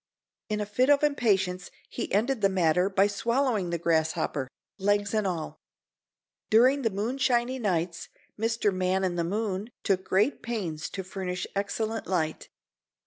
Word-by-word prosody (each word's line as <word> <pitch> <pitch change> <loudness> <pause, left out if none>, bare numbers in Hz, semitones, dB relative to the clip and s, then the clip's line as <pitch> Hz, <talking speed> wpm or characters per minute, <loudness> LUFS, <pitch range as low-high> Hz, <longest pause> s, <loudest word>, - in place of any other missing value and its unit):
In 210 0 -1
a 210 - -1
fit 250 +6 +1
of 290 0 +5
impatience 195 -10 +1 0.2
he - - -5
ended 230 +4 +1
the 195 - +4
matter 180 0 +2
by 195 0 +3
swallowing 230 -1 0
the 170 - -1
grasshopper—legs 170 - -1
and 215 -2 +1
all. 170 -4 -4 0.9
During 255 +6 +5
the 230 - +1
moonshiny 245 +4 0
nights 170 -4 -1 0.3
Mr. 225 -2 0
Man 185 +1 0
in 185 -2 0
the 170 - 0
Moon 200 +3 -2
took 190 -2 +1
great 200 +9 +1
pains 180 -10 -3
to 190 - -5
furnish 180 -1 -4
excellent 220 +3 -2
light. 160 -4 -1
200 Hz, 140 wpm, -28 LUFS, 180-225 Hz, 0.9 s, of